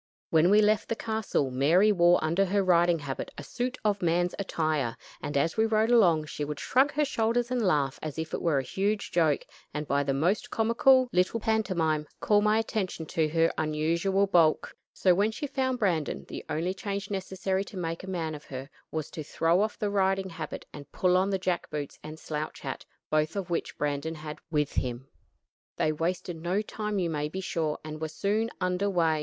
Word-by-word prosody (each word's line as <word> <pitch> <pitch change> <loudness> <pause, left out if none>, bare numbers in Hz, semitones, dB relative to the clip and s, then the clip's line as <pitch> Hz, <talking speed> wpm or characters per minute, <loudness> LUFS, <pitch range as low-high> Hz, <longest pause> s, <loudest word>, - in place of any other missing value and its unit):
When 160 +2 +5
we 210 +2 +6
left 210 -1 +2
the 230 - 0
castle, 220 - -1
Mary 165 +11 +4
wore 175 -2 +5
under 165 +5 +2
her 200 +1 +1
riding 175 -2 +4
habit 140 -3 -5
a 145 - -6
suit 250 - -3
of 205 -1 +1
man's 175 +1 +1
attire, 155 -10 -1 0.2
and, 145 - -2
as 160 +7 +1
we 220 0 +3
rode 220 +1 +2
along, 175 -10 +5
she 150 - -5
would 145 0 -4
shrug 270 +3 +3
her 300 0 +2
shoulders 235 -1 0
and 250 -1 +1
laugh 145 -9 +1
as 155 -1 -5
if 160 0 -4
it - - -2
were 165 -5 +2
a 135 - +1
huge 200 +8 -1
joke; 160 -4 +2 0.3
and 150 0 -3
by 140 +1 +2
the 135 -1 0
most 175 +9 +1
comical 250 +3 +4
little 185 +5 +2
pantomime, 180 -9 0
call 205 -1 +3
my 210 +1 +3
attention 210 -7 -2
to 155 0 0
her 165 +1 +2
unusual 165 +6 +1
bulk. 170 -5 +3 0.2
So 185 - +3
when 200 +4 +2
she 255 +7 -4
found 260 -2 -1
Brandon, 175 -10 -1
the - - -7
only 170 +4 -1
change 200 0 -4
necessary 190 0 -2
to 200 - -10
make 165 -1 -3
a 190 - -7
man 165 -4 -2
of 150 -1 -9
her 135 +1 -7 0.2
was 155 -2 -4
to 155 - -6
throw 165 +5 +2
off 215 0 -1
the 205 -1 -1
riding 195 -1 +1
habit 160 -2 -6
and 145 -1 -10
pull 180 -1 +2
on 190 +2 +3
the 195 - +1
jack 180 -2 -2
boots 150 -2 -5
and 155 +1 -8
slouch 155 -1 -5
hat, - - -5 0.3
both 155 +2 +1
of 190 -3 -4
which 170 - -2
Brandon 150 +2 -2
had 150 -1 -7
with 150 -3 0
him. 125 +1 -3 0.7
They 155 - +1
wasted 170 +2 -2
no 185 +5 0
time 210 -1 -3
you 175 -3 0
may 150 -1 -2
be 185 - -5
sure, 160 -5 -1
and 155 0 -7
were 160 - -1
soon 210 +7 0
under 180 +2 0
way. 165 -4 +2
175 Hz, 205 wpm, -28 LUFS, 155-205 Hz, 0.7 s, we